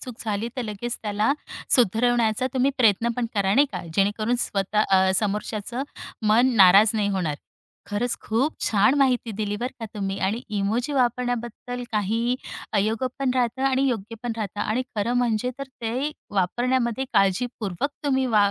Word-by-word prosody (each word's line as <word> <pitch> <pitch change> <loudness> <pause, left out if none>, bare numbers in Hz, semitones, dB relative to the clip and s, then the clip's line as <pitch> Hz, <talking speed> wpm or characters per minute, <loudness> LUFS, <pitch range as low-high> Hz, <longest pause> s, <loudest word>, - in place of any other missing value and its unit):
चूक 250 - -7
झाली 215 +2 -2
तर 255 - -1
लगेच 225 +2 -4
त्याला 210 +3 +1 0.4
सुधरवण्याचा 235 0 +3
तुम्ही 260 +1 +3
प्रयत्न 225 -1 +4
पण 245 -1 0
करा. 195 -1 +2
नाही 285 +4 +5
का? - - -4
जेणेकरून 210 +5 +1
स्वतः 200 -1 0
अ, 190 0 +4
समोरच्याचं 210 +4 -2 0.4
मन 240 +4 +4
नाराज 200 +2 +7
नाही 210 -2 +1
होणार. 180 -7 -1 0.5
खरंच 220 +4 -1
खूप 255 +8 0
छान 210 +4 +4
माहिती 250 -4 +2
दिली 205 0 -2
बरं 245 +4 -4
का 225 - -4
तुम्ही 195 -1 -3
आणि 220 +4 -2 0.2
इमोजी 225 +8 -1
वापरण्याबद्दल 245 -1 -1
काही 225 +4 0 0.4
अयोग्य 220 +4 +1
पण 270 -2 +1
राहतात 250 +1 0
आणि 265 0 +2
योग्य 230 -2 -3
पण 240 - -2
राहत 205 -2 -5
आणि 215 +4 0
खरं 210 +3 0
म्हणजे 245 0 +1
तर 275 - -4 0.2
ते 255 +6 -1 0.2
वापरण्यामध्ये 240 +6 0
काळजीपूर्वक 200 +2 0
तुम्ही 265 -2 +2
वा 210 -4 +4
225 Hz, 155 wpm, -24 LUFS, 205-245 Hz, 0.5 s, नाराज